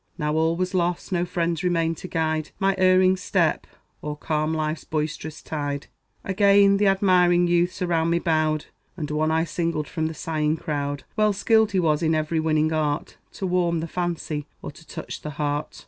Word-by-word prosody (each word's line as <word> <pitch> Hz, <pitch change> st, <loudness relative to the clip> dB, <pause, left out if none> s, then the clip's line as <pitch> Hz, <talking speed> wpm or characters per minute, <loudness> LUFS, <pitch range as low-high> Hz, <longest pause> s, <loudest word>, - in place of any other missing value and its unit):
Now 150 Hz, 0 st, -1 dB
all 160 Hz, +1 st, +2 dB
was 185 Hz, +2 st, -2 dB
lost; 175 Hz, +1 st, -1 dB
no 175 Hz, -1 st, +1 dB
friends 170 Hz, -2 st, -1 dB
remained 165 Hz, -2 st, +1 dB
to 185 Hz, -, -7 dB
guide 160 Hz, -3 st, -1 dB
My 195 Hz, 0 st, +2 dB
erring 185 Hz, 0 st, +5 dB
step, 180 Hz, -3 st, 0 dB, 0.3 s
or 150 Hz, 0 st, -5 dB
calm 155 Hz, +1 st, -1 dB
life's 155 Hz, -1 st, -2 dB
boisterous 155 Hz, 0 st, -4 dB
tide. 145 Hz, -2 st, -3 dB, 0.4 s
Again 200 Hz, 0 st, +4 dB
th' 205 Hz, -, +3 dB
admiring 180 Hz, -3 st, +4 dB
youths 175 Hz, +1 st, +1 dB
around 165 Hz, -2 st, +1 dB
me 170 Hz, -, +2 dB
bowed; 155 Hz, -3 st, 0 dB, 0.3 s
And 150 Hz, -3 st, -4 dB
one 155 Hz, +1 st, +1 dB
I 160 Hz, +1 st, +2 dB
singled 165 Hz, -2 st, -2 dB
from 160 Hz, -2 st, -2 dB
the 160 Hz, -, -6 dB
sighing 155 Hz, 0 st, -1 dB
crowd. 145 Hz, -2 st, -3 dB
Well 215 Hz, -1 st, +3 dB
skilled 220 Hz, +1 st, +3 dB
he 190 Hz, -, +3 dB
was 155 Hz, -3 st, +2 dB
in 160 Hz, -1 st, +2 dB
every 155 Hz, +1 st, 0 dB
winning 155 Hz, 0 st, +1 dB
art 150 Hz, -2 st, -1 dB, 0.2 s
To 195 Hz, -, -4 dB
warm 175 Hz, -2 st, +1 dB
the 165 Hz, -, -4 dB
fancy, 165 Hz, -4 st, -3 dB, 0.2 s
or -, -, -5 dB
to 160 Hz, +2 st, -17 dB
touch 160 Hz, -, -7 dB
the 150 Hz, -, -5 dB
heart. 145 Hz, 0 st, -2 dB
165 Hz, 185 wpm, -24 LUFS, 155-180 Hz, 0.4 s, erring